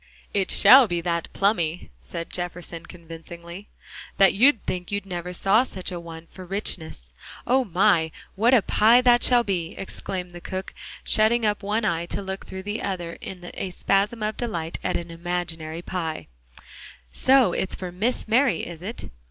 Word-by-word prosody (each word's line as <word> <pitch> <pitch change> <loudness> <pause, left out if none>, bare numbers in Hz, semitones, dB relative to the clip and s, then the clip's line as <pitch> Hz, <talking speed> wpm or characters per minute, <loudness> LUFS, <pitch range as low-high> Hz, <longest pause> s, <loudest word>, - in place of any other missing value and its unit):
"It 195 -2 0
shall 260 -1 +8
be 175 -3 -1
that 170 -1 -2
plummy," 175 - 0
said 165 - -7
Jefferson 175 -1 -5
convincingly, 170 +2 -11 0.5
"that 195 -1 +6
you'd 240 +2 +4
think 180 0 -4
you 200 - 0
never 180 -2 -5
saw 195 +5 +3
such 190 -8 -4
a 175 - -4
one 165 -1 -10
for 185 - -10
richness. 165 - -4 0.3
Oh, 260 +2 +3
my! 180 -4 +2 0.2
what 235 +6 +4
a 225 - +4
pie 230 +4 +5
that 240 -1 +4
shall 245 -1 +5
be!" 175 -6 -3
exclaimed 185 -1 -5
the 175 0 -10
cook, 190 +1 -6 0.3
shutting 220 +2 +2
up 210 0 0
one 210 +2 -1
eye 170 -4 -1
to - - -3
look 190 0 -6
through 190 0 -7
the 205 +2 -4
other 175 -3 -4
in 180 -2 -8
a 190 - -4
spasm 200 +5 0
of 215 0 -2
delight 170 -9 -3
at - - 0
an 170 0 -7
imaginary 165 -1 -4
pie; 165 -4 -4 0.9
"so 260 - +4
it's 190 - -2
for 180 -1 -6
Miss 220 +9 -1
Mary, 250 +4 +2
is 170 -1 -9
it?" 215 +6 -4
185 Hz, 170 wpm, -24 LUFS, 170-215 Hz, 0.9 s, shall